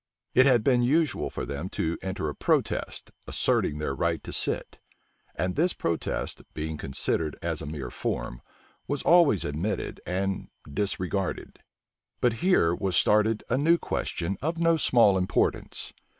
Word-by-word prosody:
It 130 +2 +6
had 120 -5 +4
been 125 -1 +4
usual 150 +6 +1
for - - -5
them 70 +6 -4
to 80 +1 0
enter 95 -4 -3
a 75 - -2
protest, - - -1 0.2
asserting 75 - +1
their 75 -2 -2
right 65 - -1
to - - -7
sit; - - -2 0.6
and 90 +3 -1
this 175 +3 +2
protest, 85 -1 -2
being 80 0 -3
considered 75 +2 -2
as - - -2
a - - -6
mere 70 -5 -5
form, - - -3 0.5
was 145 -1 -2
always 165 - +5
admitted 80 +9 -3
and 95 +1 -2 0.2
disregarded. 95 +3 -2 0.6
But 120 -2 +3
here 175 - +4
was 95 0 -1
started 105 +3 +3
a 125 - +1
new 165 +4 +4
question 90 - -3
of 160 +4 -1
no 165 0 +3
small 115 -10 +4
importance. 90 - -1
95 Hz, 150 wpm, -27 LUFS, 80-130 Hz, 0.6 s, It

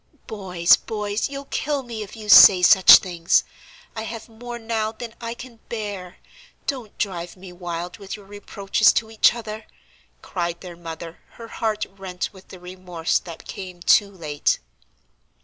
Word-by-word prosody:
"Boys, 180 -5 +2
boys, 210 +1 -3
you'll 280 0 -7
kill 285 0 -2
me 230 -3 -7
if 205 - -8
you 215 -1 -10
say 190 -3 +9
such 185 +1 +9
things! 175 -3 +2 0.5
I 220 - -4
have 225 0 -7
more 240 +1 -8
now 225 -1 -2
than 230 0 -9
I 230 0 -5
can 240 -1 -12
bear. 205 -5 -6 0.5
Don't 250 -7 -5
drive 175 -3 -4
me 185 -1 -12
wild 175 0 -6
with 195 -1 -7
your 205 -2 -14
reproaches 205 +1 +1
to 220 0 -1
each 225 +1 +4
other!" 220 -2 -7 0.6
cried 170 -2 -4
their 180 -2 -9
mother, 165 0 -9
her 230 -1 -11
heart 220 -2 -2
rent 190 -2 -6
with 190 -1 -16
the 185 - -12
remorse 180 -2 -2
that 170 -2 -11
came 185 -2 -8
too 200 +3 +4
late. 155 -7 -1
200 Hz, 160 wpm, -23 LUFS, 180-225 Hz, 0.6 s, say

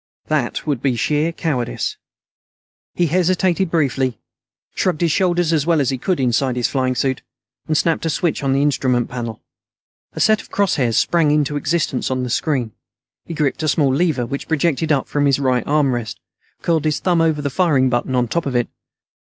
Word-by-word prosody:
That 150 -6 -1
would 145 -6 -1
be 135 -3 +1
sheer 150 +6 0
cowardice. 135 -8 -2 1.0
He 175 - +2
hesitated 185 +2 +1
briefly, 135 -7 0 0.6
shrugged 175 -4 -1
his 170 -2 +2
shoulders 175 -2 +1
as 155 -1 +1
well 165 -2 +3
as 135 -2 +1
he 130 - -3
could 180 +5 -1
inside 130 0 +1
his 120 -1 +1
flying 130 -2 -1
suit, 130 +1 -1 0.5
and 155 - +1
snapped 165 0 +1
a - - 0
switch 165 +1 -1
on 135 - +1
the 135 +1 +2
instrument 130 -4 +1
panel. 115 -3 -5 0.7
A - - -7
set 215 -1 +3
of - - -18
cross 200 -2 +1
hairs 120 -5 +1
sprang 165 -3 +2
into 150 -1 +1
existence 145 -3 -1
on 130 -1 -1
the 125 - -3
screen. 130 -7 -1 0.5
He 170 - -6
gripped 150 0 -1
a 155 - -1
small 140 -2 +2
lever 145 -5 +1
which 140 +4 -5
projected 160 0 0
up 140 -3 +1
from 145 -1 +1
his 140 - +3
right 130 -3 +1
armrest; 135 -6 0 0.4
curled 160 -2 +1
his 155 -1 +1
thumb 175 -3 +1
over 160 -2 +2
the 140 - -2
firing 145 -5 +2
button 120 +1 -1
on 125 -1 +1
top 170 +6 -2
of 130 - -3
it. 120 -1 +1
145 Hz, 195 wpm, -19 LUFS, 130-165 Hz, 1.0 s, well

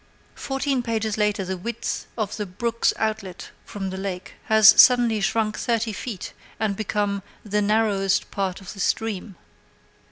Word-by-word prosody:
Fourteen 270 -1 -1
pages 220 -3 -1
later 210 -2 0
the 190 +1 -3
width 235 +5 -4
of 215 -3 -2
the 210 -2 -4
brook's 230 +5 0
outlet 215 -4 -3
from 195 -2 -5
the 190 - -5
lake 190 -2 -5
has 220 -1 +7
suddenly 240 -4 +4
shrunk 215 +1 0
thirty 230 -2 0
feet, 205 -2 -6 0.3
and 210 -2 0
become 205 -1 -1 0.2
"the 210 0 0
narrowest 205 -2 +1
part 190 -2 -2
of 190 - -9
the 200 - -12
stream." 205 -1 -2
210 Hz, 150 wpm, -24 LUFS, 195-225 Hz, 0.3 s, has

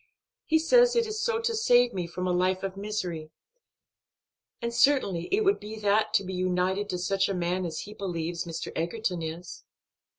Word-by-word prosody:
He 320 - +3
says 485 +10 +4
it 470 -1 +3
is 430 0 -4
to 465 0 0
save 245 - +4
me 180 -3 -3
from 180 +2 -5
a 180 - +1
life 185 +1 +1
of 195 -1 -3
misery, 185 -6 -4 1.3
and 235 0 -3
certainly 235 -9 +2
it 410 - +3
would 395 0 +3
be 210 +1 -8
that 210 0 +2
to - - +3
be 190 0 -6
united 185 +2 0
to 180 - -2
such 195 +3 0
a 195 - -1
man 180 +1 -1
as 160 - -5
he 210 - -9
believes 175 -4 -4
Mr. 165 -1 -5
Egerton 175 +1 -2
is." 165 +2 -7
195 Hz, 185 wpm, -27 LUFS, 180-240 Hz, 1.3 s, says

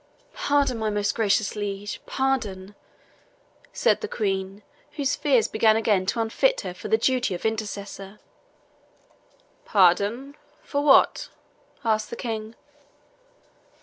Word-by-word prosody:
"Pardon, 280 -4 +1
my 220 -1 -1
most 205 -1 0
gracious 210 -1 +1
liege 205 0 -5
pardon!" 210 -8 -2 1.0
said - - +1
the 435 - -3
Queen, 195 - -3 0.3
whose 285 -2 -1
fears 275 -6 +2
began 220 0 +3
again 205 -4 +1
to 230 - -1
unfit - - +1
her - - -6
for - - -8
the 440 - +3
duty 255 - 0
of 175 - -8
intercessor. 205 -2 -4 1.4
"Pardon 205 - +2 0.3
for 285 0 -2
what?" 275 -2 +4 0.6
asked 215 -1 +1
the - - -6
King. 225 -1 -5
220 Hz, 115 wpm, -24 LUFS, 200-265 Hz, 1.4 s, what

